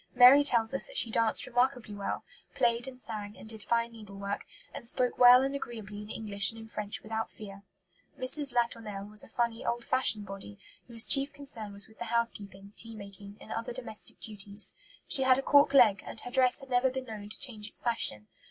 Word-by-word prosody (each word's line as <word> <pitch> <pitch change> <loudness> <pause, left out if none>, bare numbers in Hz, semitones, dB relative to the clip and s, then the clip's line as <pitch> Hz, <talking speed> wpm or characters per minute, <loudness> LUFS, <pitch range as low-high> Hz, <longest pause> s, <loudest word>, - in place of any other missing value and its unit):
Mary 255 +3 +8
tells 235 -4 +3
us 270 - +2
that - - -6
she 230 - +4
danced 225 0 +2
remarkably 245 -3 0
well, 200 -1 -4 0.3
played 235 +1 +1
and 255 -1 -9
sang 210 -3 -8
and - - -12
did 220 -1 -8
fine 235 +2 0
needlework, 200 -3 -7 0.3
and 235 - -6
"spoke 250 +1 0
well 250 +1 +8
and 270 +1 -2
agreeably 220 -6 -7
in 210 - -11
English 205 -3 0
and 225 - -9
in 225 - -10
French 210 -2 -6
without 220 +1 -4
fear." 200 -2 -11 0.6
Mrs. 275 +2 -1
Latournelle 225 -4 -2
was 210 0 +2
a - - -12
funny, 235 0 -2
old 235 0 -2
fashioned 225 -5 +1
body, 195 - -9 0.3
whose 230 -2 +4
chief 275 0 +6
concern 255 -7 -9
was 200 0 -4
with 220 - -22
the 235 - -4
housekeeping, 205 -4 -3
tea 225 0 -1
making, 200 0 -11
and 220 - -13
other 230 +1 -4
domestic 240 -4 -3
duties. 205 -1 +1 0.3
She 275 - +3
had 260 -1 +4
a 270 - -2
cork 285 0 +5
leg, 230 -8 +5
and - - -8
her 245 - -8
dress 255 +2 +2
had 270 -1 -13
never 245 +1 +3
been 260 0 -5
known 210 -3 -8
to - - -4
change 220 -6 -1
its - - -4
fashion. 225 - 0
230 Hz, 205 wpm, -30 LUFS, 210-250 Hz, 0.6 s, Mary